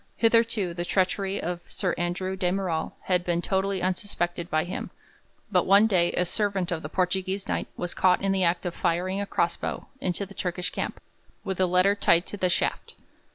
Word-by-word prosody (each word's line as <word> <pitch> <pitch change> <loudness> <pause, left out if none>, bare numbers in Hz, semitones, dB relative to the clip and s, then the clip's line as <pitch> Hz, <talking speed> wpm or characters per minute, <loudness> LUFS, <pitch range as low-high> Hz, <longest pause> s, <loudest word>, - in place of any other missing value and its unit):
Hitherto 230 -5 +3
the 175 0 -3
treachery 195 +2 0
of 175 +1 -3
Sir 180 -4 -1
Andrew 180 +2 -2
de 180 -2 0
Merall 185 -4 -1
had 180 -1 +1
been 175 -1 0
totally 190 +1 0
unsuspected 175 -2 -1
by 155 0 +2
him, 175 - -5 0.6
but 180 -3 +3
one 200 +3 +7
day 180 -5 +3
a 180 - +1
servant 195 -1 -1
of 165 -2 -2
the 150 - -6
Portuguese 190 +2 -1
Knight - - -1
was 175 -1 -2
caught 185 -1 +4
in 195 - +2
the 190 -1 +2
act 170 +2 +1
of 175 - -2
firing 185 +4 0
a 200 - -3
cross - - +1
bow - - -4
into 185 0 -2
the 200 - -13
Turkish 180 -2 -3
camp, - - -3 0.4
with 190 -1 -3
a 185 - +4
letter 180 +3 +4
tied 175 -4 +3
to 205 - -5
the 185 -2 +1
shaft. 175 - -1
185 Hz, 200 wpm, -26 LUFS, 175-195 Hz, 0.6 s, one